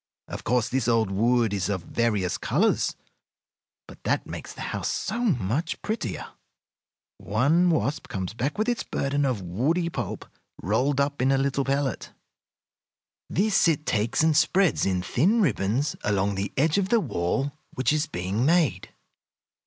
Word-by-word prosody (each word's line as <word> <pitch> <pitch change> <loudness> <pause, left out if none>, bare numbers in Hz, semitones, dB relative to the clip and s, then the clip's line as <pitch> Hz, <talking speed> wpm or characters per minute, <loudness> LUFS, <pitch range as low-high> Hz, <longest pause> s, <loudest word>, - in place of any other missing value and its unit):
Of - - -7
course 125 -1 +1
this 130 -2 -1
old 115 -4 +2
wood 115 +2 +2
is 95 -2 -1
of 95 -4 -2
various 105 -4 0
colors, - - +1 0.9
but - - -14
that - - 0
makes - - -7
the - - -10
house - - -2
so 220 +4 -2
much 150 - 0
the - - -21
prettier. 220 +1 -4 0.9
One 145 - +2
wasp 150 -2 0
comes 95 -1 -4
back 135 +6 -2
with 215 +2 0
its 240 -1 0
burden 140 +1 -1
of 115 -7 -2
woody 145 - 0
pulp 110 - -5 0.3
rolled 125 - +1
up 140 -1 0
in 130 +1 +3
a 135 - +3
little 135 0 0
pellet. 135 -1 -2 1.2
This 200 0 +2
it 155 -2 +1
takes 115 +7 +1
and 160 -1 +3
spreads 185 - +3
in 90 -2 0
thin 175 - +2
ribbons 135 - +1
along 100 -1 +1
the 100 +1 -3
edge 155 +7 +3
of 190 -1 -1
the 235 - +4
wall 135 - -1 0.2
which 130 +3 +1
is 155 +1 0
being 95 +6 -2
made. 165 0 +2
135 Hz, 160 wpm, -26 LUFS, 105-155 Hz, 1.2 s, the